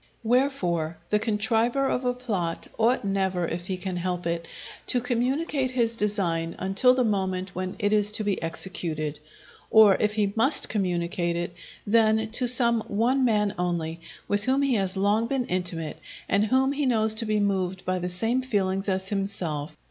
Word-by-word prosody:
Wherefore, 200 - 0
the 210 - +3
contriver 225 +4 +1
of 250 - -1
a 245 0 0
plot 195 -10 -3
ought 235 0 +2
never, 190 -3 0
if 175 +2 -5
he 185 - -2
can 185 -1 -4
help 180 0 -3
it, 170 0 -2 0.4
to 250 - +3
communicate 260 +4 0
his 235 -2 0
design 180 -6 -1
until 195 +7 +3
the 255 - +2
moment 190 -3 -1
when 185 0 -4
it 205 +1 0
is 210 -1 +3
to 215 - +2
be 205 -2 -1
executed; 160 -3 -3 0.5
or 215 -3 +7
if 210 0 +1
he 205 -2 0
must 265 +7 +2
communicate 175 -3 -1
it, 175 0 -3 0.3
then 220 0 +3
to 245 +2 +1
some 235 -2 +4
one 245 +6 +1
man 210 -4 +2
only, 170 -2 -2 0.3
with 205 +1 0
whom 265 +2 +2
he 275 -2 +2
has 195 -3 -1
long 205 +4 +2
been 265 -1 -1
intimate, 175 -5 -3 0.3
and 200 +2 +2
whom 265 +3 +2
he 285 -1 -1
knows 220 -3 +2
to 220 +1 0
be 215 0 +1
moved 190 -2 -1
by 185 0 0
the 180 0 -3
same 225 +8 0
feelings 195 -5 -1
as 190 0 -1
himself. 185 -7 -3
205 Hz, 175 wpm, -26 LUFS, 180-235 Hz, 0.5 s, or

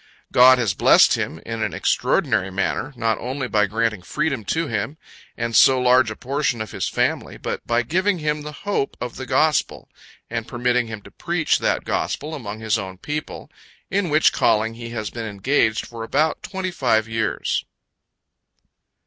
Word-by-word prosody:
God 130 +1 +7
has 115 -6 +1
blessed - - +6
him 80 - -2
in 115 -1 -4
an 105 -2 -2
extraordinary 95 - +1
manner, 100 +8 -2
not 115 -2 0
only 130 +1 -3
by 105 -3 +2
granting 110 -1 -1
freedom 145 - -2
to 165 +10 0
him 115 +4 -3 0.4
and 115 -1 -2
so 130 -1 +6
large 125 -1 +4
a 110 - -5
portion 135 -1 -1
of 110 - -5
his - - -2
family, - - -1
but - - -4
by 120 0 +2
giving 185 - +1
him 150 -1 -1
the 150 +1 -7
hope 200 -9 -1
of 125 -1 -5
the 130 0 -7
gospel, 155 +3 +1 0.4
and 115 0 -4
permitting 125 -1 0
him 110 -2 -7
to - - -14
preach - - 0
that - - 0
gospel 155 +2 -2
among 110 -7 -6
his 110 0 +1
own 95 -2 -7
people 150 +9 -6 0.4
in 195 -2 0
which 155 +1 +4
calling 110 +1 +2
he 115 0 -8
has 110 -3 -4
been 115 -2 -5
engaged 110 +2 +1
for 115 -1 -8
about 150 +7 0
twenty 190 -1 -4
five 115 -9 +1
years. 115 -1 -1
120 Hz, 175 wpm, -22 LUFS, 110-145 Hz, 0.4 s, God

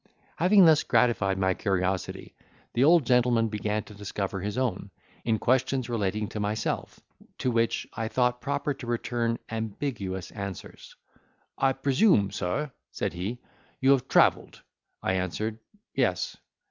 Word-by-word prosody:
Having 185 +3 +6
thus 160 -2 +6
gratified 95 -6 +2
my 95 -1 +2
curiosity, 95 -1 -2 0.4
the 120 - +3
old 160 -1 +6
gentleman 120 -2 +3
began 105 0 -2
to 105 - -13
discover 100 -1 -4
his 105 +3 -3
own, 110 -6 -1 0.4
in 115 -2 +2
questions 130 +1 +1
relating 105 -2 -1
to 110 - -5
myself, 105 +1 -2 0.4
to 125 - 0
which 115 0 +1
I 115 -1 -3
thought 125 +1 +1
proper 140 +1 -1
to 125 - -10
return 120 0 -1
ambiguous 110 -4 -4
answers. 100 -3 -8 0.6
"I 135 0 +2
presume, 135 - +3
Sir," 135 +11 -2 0.2
said - - -3
he, 100 +8 -4 0.4
"you 135 +1 +4
have 135 -3 +3
travelled." - - +2 0.4
I 95 - +1
answered, 105 +4 -2 0.3
"Yes." - - 0
115 Hz, 135 wpm, -27 LUFS, 100-130 Hz, 0.6 s, Having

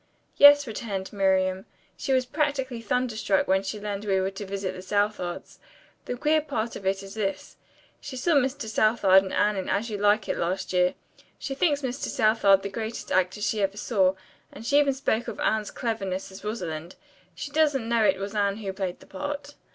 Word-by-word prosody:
"Yes," 285 0 +8
returned 210 -4 -5
Miriam. 190 -1 +1 0.3
"She - - -3
was 260 -1 +3
practically 265 -3 -1
thunderstruck 225 -3 0
when 190 0 +3
she 195 +2 -5
learned 205 -1 -4
we 195 -2 +1
were 190 +1 -1
to 195 +1 -7
visit 195 -1 -3
the 185 - -8
Southards. 205 -2 -2 0.5
The 245 - -4
queer 310 +4 +2
part 240 -7 -3
of 195 - -5
it 195 0 0
is 195 0 -9
this. 195 -3 -4 0.4
She 260 - -8
saw 340 +7 0
Mr. 270 -2 +1
Southard 215 -3 +4
and 190 - -6
Anne 210 0 +2
in 190 - -3
'As 220 +3 -1
You 205 - -3
Like 205 0 +3
It' - - -2
last 180 +2 -2
year. 180 0 +3 0.4
She 275 - -4
thinks 290 -1 +1
Mr. 260 +1 -3
Southard 205 -3 +3
the - - -2
greatest 220 +3 -5
actor 185 +2 +1
she 210 +1 0
ever 195 +1 0
saw, 195 -4 +2 0.4
and 220 - -11
she 285 +4 +4
even 280 -2 +2
spoke 240 -3 -1
of - - -6
Anne's 215 -1 0
cleverness 195 -6 -3
as 190 - -11
Rosalind; 175 -6 -5 0.4
she 290 - -6
doesn't 290 -6 +2
know 230 -1 +2
it - - +3
was 200 +2 -5
Anne 200 -1 +1
who 200 -3 -5
played 190 -2 -4
the - - -14
part." 290 0 -6
210 Hz, 200 wpm, -26 LUFS, 195-250 Hz, 0.5 s, Yes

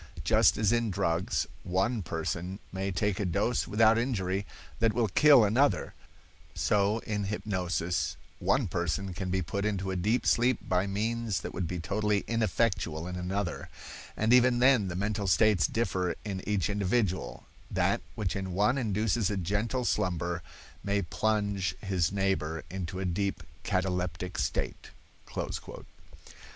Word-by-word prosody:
Just - - +4
as 105 -1 +2
in 120 -1 +1
drugs, 85 -1 0 0.2
one 95 +6 0
person 85 +3 -3
may 95 +1 -2
take 100 +1 0
a - - 0
dose 100 +6 0
without 110 +2 +4
injury 100 -6 -1 0.3
that 115 -1 +3
will 115 0 +2
kill 140 +4 +7
another, 130 +8 +2 0.6
so 100 +6 +2
in 105 -2 -2
hypnosis, 90 -7 -2 0.2
one - - +2
person 90 +2 -2
can 90 +2 -4
be 95 0 0
put 100 +6 -3
into 95 -2 -1
a - - -2
deep 105 +7 +1
sleep 120 +1 +3
by 90 +1 +1
means 110 +1 -1
that - - -6
would 95 -3 -2
be 90 +1 -3
totally 100 +3 0
ineffectual 110 -8 0
in 90 - -5
another, 90 0 -3 0.5
and 110 +2 +3
even 125 0 +5
then 125 -5 +4
the 90 - -4
mental 100 +1 -1
states 100 -6 +4
differ 95 -6 -1
in 95 -2 -3
each 100 -4 +1
individual—that 100 - -1
which 105 -5 -2
in 95 -2 -3
one 105 +8 +2
induces 110 -2 0
a 105 - -1
gentle 105 +7 -1
slumber 85 -3 0 0.4
may 100 0 0
plunge 100 0 0
his 95 -5 0
neighbor 95 -5 -1
into 95 -1 -4
a 95 - -2
deep 95 0 -1 0.2
cataleptic 90 -2 -2
state." - - -2
100 Hz, 140 wpm, -29 LUFS, 90-110 Hz, 0.6 s, kill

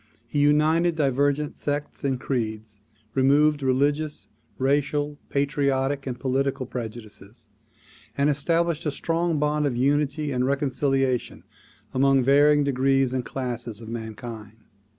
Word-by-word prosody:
He 145 - -2
united 155 +4 +3
divergent 145 0 0
sects 145 0 -4
and 135 -2 0
creeds, 110 -5 -4 0.3
removed 145 +2 +3
religious, 145 +3 0 0.3
racial, 145 +2 0
patriotic 140 -1 0
and 125 -2 -4
political 135 0 -1
prejudices 110 -3 -8 0.7
and 140 +1 +3
established 165 +2 0
a - - +3
strong 165 +2 -1
bond 150 0 +1
of 125 -4 -2
unity 145 +3 +1
and 125 -1 0
reconciliation 135 -1 0 0.5
among 135 0 +3
varying 145 +2 +5
degrees 135 -1 +1
and 130 -1 -1
classes 120 -4 -5
of 115 -1 -10
mankind. 110 -1 -7
140 Hz, 115 wpm, -25 LUFS, 125-145 Hz, 0.7 s, varying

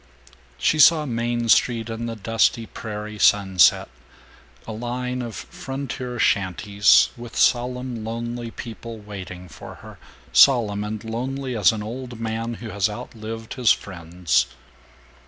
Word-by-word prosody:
She 155 - +1
saw 155 +2 +6
Main 120 -1 -2
Street 115 0 +3
in 115 +1 -4
the 115 - -4
dusty 115 +2 +1
prairie 105 -1 -7
sunset, 95 -3 +4 0.8
a - - -6
line 125 +3 -4
of 115 -3 -6
frontier 130 -2 -6
shanties 100 -1 +3
with 120 -1 -10
solemn 125 -1 +1
lonely 120 +1 -4
people 115 0 -8
waiting 95 -4 -9
for 80 - -11
her, - - -12 0.3
solemn 110 -7 +5
and 105 0 -5
lonely 130 +3 -4
as 105 -5 +5
an 110 -2 -5
old 120 +1 -7
man 115 +1 -3
who 115 0 -8
has 100 +1 +1
outlived 115 0 -7
his 125 -4 +1
friends. 85 -2 0
115 Hz, 130 wpm, -23 LUFS, 105-120 Hz, 0.8 s, saw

